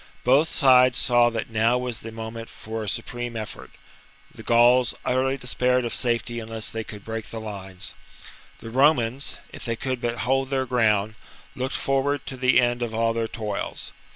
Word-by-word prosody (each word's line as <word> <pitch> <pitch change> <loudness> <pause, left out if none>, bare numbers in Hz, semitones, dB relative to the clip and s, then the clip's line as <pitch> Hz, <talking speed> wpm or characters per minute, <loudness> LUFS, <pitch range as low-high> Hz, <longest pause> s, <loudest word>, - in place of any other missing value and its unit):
Both 140 +6 +4
sides 130 -3 +5
saw 120 -1 +4
that 115 0 -4
now 115 +2 +3
was 125 -3 -3
the 115 - -8
moment 115 +1 -7
for 110 +1 -6
a 105 - -2
supreme 120 +2 -4
effort: 110 -1 -6 0.6
the - - -11
Gauls 120 +1 +4
utterly 130 +2 +1
despaired 125 0 +1
of 120 - -2
safety 120 -1 -1
unless 110 0 -4
they 115 0 -3
could 105 -2 -10
break 115 -1 -5
the 115 - -6
lines; 100 -3 -7 0.7
the 115 - -8
Romans, 135 -1 +2 0.2
if - - -9
they 115 -2 -2
could 130 +1 -3
but 120 0 -2
hold 135 +1 +1
their 135 -1 0
ground, 110 -4 +2 0.4
looked 130 +1 -2
forward 135 +1 0
to 130 - -5
the 130 0 +4
end 120 -1 +1
of 115 -2 -2
all 115 0 +2
their 115 -1 -1
toils. 105 -3 -4
120 Hz, 180 wpm, -24 LUFS, 115-130 Hz, 0.7 s, sides